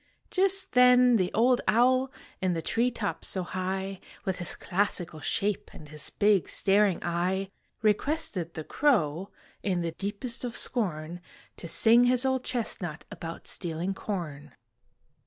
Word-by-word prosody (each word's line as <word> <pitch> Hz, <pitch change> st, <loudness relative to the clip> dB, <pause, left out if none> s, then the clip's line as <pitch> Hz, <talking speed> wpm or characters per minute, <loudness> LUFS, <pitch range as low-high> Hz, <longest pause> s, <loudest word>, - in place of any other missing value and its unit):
Just 385 Hz, 0 st, +3 dB
then 250 Hz, -1 st, +6 dB
the 185 Hz, -3 st, 0 dB
old 245 Hz, +2 st, +3 dB
owl 255 Hz, +3 st, +3 dB, 0.3 s
In 185 Hz, -1 st, +1 dB
the 165 Hz, -, -2 dB
tree 235 Hz, +2 st, +1 dB
top 200 Hz, -9 st, -4 dB
so 185 Hz, -, 0 dB
high, 190 Hz, +1 st, -3 dB, 0.3 s
With 190 Hz, -1 st, -2 dB
his 175 Hz, -, 0 dB
classical 175 Hz, -4 st, -1 dB
shape 200 Hz, +6 st, -1 dB
And 150 Hz, -, -12 dB
his 150 Hz, 0 st, -3 dB
big 205 Hz, -3 st, +2 dB
staring 200 Hz, -2 st, +3 dB
eye, 185 Hz, +3 st, -1 dB, 0.3 s
Requested 210 Hz, -, 0 dB
the 160 Hz, -, -4 dB
crow, 190 Hz, -, +1 dB, 0.3 s
In 185 Hz, -3 st, 0 dB
the 170 Hz, -1 st, -2 dB
deepest 205 Hz, +8 st, -4 dB
of 245 Hz, -1 st, -4 dB
scorn, 175 Hz, -7 st, -2 dB, 0.4 s
To 170 Hz, -, -7 dB
sing 230 Hz, +8 st, +5 dB
his 250 Hz, +1 st, +3 dB
old 260 Hz, -1 st, +1 dB
chestnut 185 Hz, -, -3 dB
About 165 Hz, -1 st, -7 dB
stealing 175 Hz, +2 st, -3 dB
corn. 155 Hz, -, -6 dB
195 Hz, 140 wpm, -28 LUFS, 175-240 Hz, 0.4 s, then